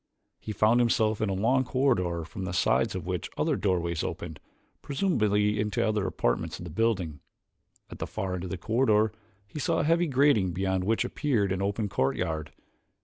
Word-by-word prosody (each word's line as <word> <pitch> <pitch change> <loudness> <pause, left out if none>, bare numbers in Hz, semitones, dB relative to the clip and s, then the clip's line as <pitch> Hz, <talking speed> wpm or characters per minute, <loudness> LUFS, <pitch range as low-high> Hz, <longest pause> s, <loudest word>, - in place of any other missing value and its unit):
He 110 - -6
found 110 +3 +3
himself 110 -3 +2
in 110 - +1
a - - 0
long 125 +7 +2
corridor 100 - 0
from 85 +4 -7
the 90 -2 -4
sides 95 - +2
of 90 -3 -4
which 90 -1 -3
other - - +1
doorways 85 -4 0
opened, - - -5 0.4
presumably 105 - +1
into 105 0 0
other 105 -3 0
apartments 80 +1 -1
of - - -9
the 85 - -7
building. 90 -6 0 0.7
At - - -9
the - - -3
far 95 -1 -3
end 90 0 -4
of - - -6
the 95 - -4
corridor 110 +1 +2 0.3
he 105 +9 -8
saw 165 +2 +1
a - - +1
heavy 165 +3 +2
grating 135 - +3
beyond 95 0 -1
which 110 +2 +1
appeared 115 -10 0
an 95 0 -1
open 100 +2 -1
courtyard. 80 -1 -1
100 Hz, 185 wpm, -28 LUFS, 90-115 Hz, 0.7 s, found